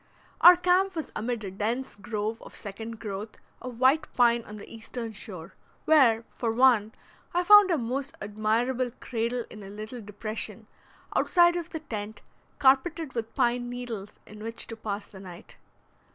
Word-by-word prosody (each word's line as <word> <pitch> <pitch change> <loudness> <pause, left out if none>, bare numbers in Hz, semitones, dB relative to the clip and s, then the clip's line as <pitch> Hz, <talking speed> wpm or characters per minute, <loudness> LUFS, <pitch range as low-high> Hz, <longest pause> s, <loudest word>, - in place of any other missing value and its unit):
Our 355 +1 +10
camp 365 +1 +2
was 320 - -4
amid 230 0 -3
a 195 - -5
dense 225 +7 -2
grove 215 +2 -4
of - - -12
second 220 +2 -7
growth 210 0 -6 0.2
of 245 -2 -8
white 270 +5 +3
pine 235 -1 +4
on 210 - -9
the 205 - -10
eastern 230 +1 -7
shore, 185 -6 -8 0.3
where, 240 -8 +5
for 235 - -2
one, 230 -3 +4 0.4
I 355 - +3
found 415 +1 +8
a 335 - +2
most 265 +3 -3
admirable 225 +5 0
cradle 235 0 -2
in 215 - -10
a 195 - -9
little 215 +4 -7
depression, 215 +1 -5 0.5
outside 345 -1 +4
of 345 -1 -4
the 320 -3 -6
tent, 215 -6 -6 0.3
carpeted 280 +3 +2
with 225 -1 -4
pine 245 -2 +1
needles, 240 -5 -6
in 210 0 -12
which 230 +1 -4
to 225 - -5
pass 210 -2 -4
the 190 - -13
night. 180 -2 -12
230 Hz, 165 wpm, -27 LUFS, 215-265 Hz, 0.5 s, Our